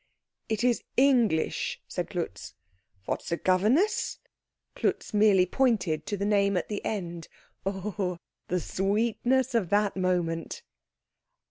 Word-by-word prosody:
"It 220 +1 -1
is 245 -2 +2
English," 245 - +2
said - - -4
Klutz. - - -5 0.5
"What, - - -2
the 170 - -1
governess 215 - +2 0.3
?" - - -55
Klutz - - -1
merely 205 -3 +5
pointed 185 - +1
to 205 - -2
the 200 - -2
name 200 -2 +2
at 175 - -2
the 210 - -4
end. 175 -6 -4 0.4
Oh, 195 -2 -2 0.3
the 180 - 0
sweetness 235 +8 0
of 215 -7 +1
that 205 0 +2
moment! 175 -3 -1
200 Hz, 125 wpm, -28 LUFS, 180-225 Hz, 0.5 s, merely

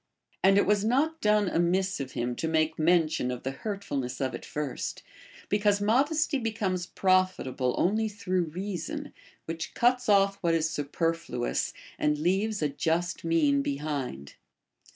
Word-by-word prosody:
* - - -39
And 195 +1 +6
it 200 - +4
was 205 0 +2
not 285 +8 +1
done 210 -1 +3
amiss 185 +2 +1
of 130 -1 -5
him 120 +1 -2
to 160 - -1
make 160 0 +1
mention 160 -5 +2
of 125 -1 -4
the 135 - -2
hurtfulness 140 - -4
of 130 -1 -1
it - - -6
first, 150 -3 -4 0.4
because 205 0 +2
modesty 280 +7 +2
becomes 200 -6 -2
profita 185 -8 +1
ble 125 -1 0
only 215 +4 +1
through 185 -4 -1
reason, 200 - -5 0.3
which 165 0 -5
cuts 245 0 +2
off 200 -1 +4
what 170 -3 +1
is 160 -1 +1
superflu 160 -4 -2
ous - - -1 0.3
and 150 0 +2
leaves 195 +5 0
a 150 - +2
just 170 +4 -1
mean 155 -4 +3
behind. 140 - -4
175 Hz, 155 wpm, -28 LUFS, 150-205 Hz, 0.4 s, And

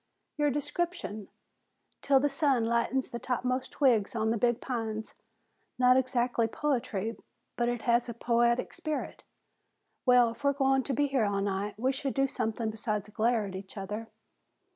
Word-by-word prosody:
"Your 295 -1 +2
description. 290 - -3 0.7
''Til 275 -1 +4
the - - +5
sun 275 -5 +1
lightens 235 +3 0
the 235 - -4
topmost 255 +1 -2
twigs 235 -7 +2
on 220 0 +1
the 230 - +1
big 240 0 +2
pines.' 225 -4 -4 0.6
Not 250 0 +5
exactly 245 -2 +1
poetry, 230 -5 -1 0.4
but 240 0 +1
it 240 -1 -3
has 240 0 +2
a 235 - -5
poetic 235 +1 +1
spirit. 310 -3 -4 0.8
Well, 250 -2 +5
if 235 - -13
we're 280 0 +3
going 270 -1 +2
to - - +1
be 290 - +2
here 270 -5 +1
all 200 -1 0
night, 200 +1 -2
we 255 +4 +1
should 270 0 -3
do 270 0 +3
something 225 -3 -2
besides 210 -2 -3
glare 225 0 +1
at 195 - -7
each 190 +2 -9
other." 210 +3 -5
240 Hz, 165 wpm, -30 LUFS, 220-265 Hz, 0.8 s, the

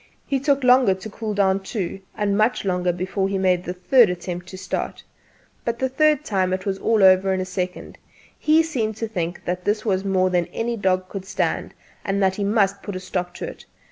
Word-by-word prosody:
He 275 -1 0
took 280 0 +1
longer 250 -5 +5
to 190 +3 -8
cool 215 0 -4
down, 195 -1 +3
too, 195 -1 -4 0.2
and 205 -1 0
much 215 +1 +1
longer 180 -1 +1
before 190 +2 -2
he 195 - -1
made 185 -2 +2
the 180 - -3
third 225 +5 +4
attempt 180 0 -5
to 185 - -9
start. 185 -1 -4 0.6
But 235 0 -2
the 260 +2 0
third 300 +2 +2
time 185 -3 0
it 185 0 -3
was 195 -1 -2
all 220 -3 +2
over 190 0 +6
in - - -2
a 185 - -2
second. 185 -1 -5 0.4
He 315 +1 +4
seemed 230 -9 -2
to 225 +1 -3
think 175 -5 -4
that 180 +1 -2
this 210 +3 0
was 190 -3 +1
more 185 -1 +1
than 175 -2 +1
any 235 +1 -2
dog 185 -3 0
could 190 0 -7
stand, 195 0 -2 0.3
and 195 0 -1
that 190 0 +2
he 205 - -1
must 200 -1 +2
put 205 - -6
a - - -3
stop 180 -1 -4
to - - -5
it. - - -10
195 Hz, 220 wpm, -22 LUFS, 185-220 Hz, 0.6 s, over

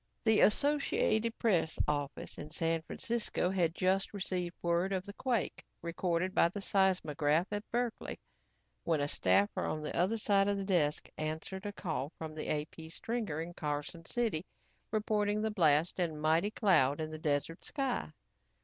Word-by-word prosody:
The 220 -2 +4
Associated 230 -3 +3
Press 175 -8 +2
office 145 -1 -3
in 150 - -7
San 165 +1 0
Francisco 225 0 -1
had 175 -3 +1
just 190 +2 +1
received 180 -3 -2
word 170 +3 +1
of 185 0 -1
the 200 - -8
quake 245 0 -1 0.2
recorded 170 +2 -1
by 170 - +5
the 205 - -6
seismograph 175 -6 +2
at 205 0 -2
Berkeley 240 -1 -2 0.6
when 165 -3 +1
a 145 - +1
staffer 200 +7 +2
on 155 0 -2
the 150 - -4
other 190 +7 +2
side 200 -2 +3
of 200 0 +1
the 195 - -3
desk 165 -6 +1
answered 160 +6 -4
a - - -3
call 160 -7 -3
from 160 -1 -6
the 155 - -5
AP 155 +2 -3
stringer 215 -2 -3
in 170 +2 -6
Carson 150 +2 -4
City, 220 -9 0 0.5
reporting 210 -1 +1
the 220 - 0
blast 165 -3 +3
and 160 -4 -1
mighty 160 +6 +3
cloud 170 - +3
in 155 0 -3
the 155 - -6
desert 150 +2 -1
sky. 270 -4 -2
180 Hz, 160 wpm, -33 LUFS, 155-205 Hz, 0.6 s, by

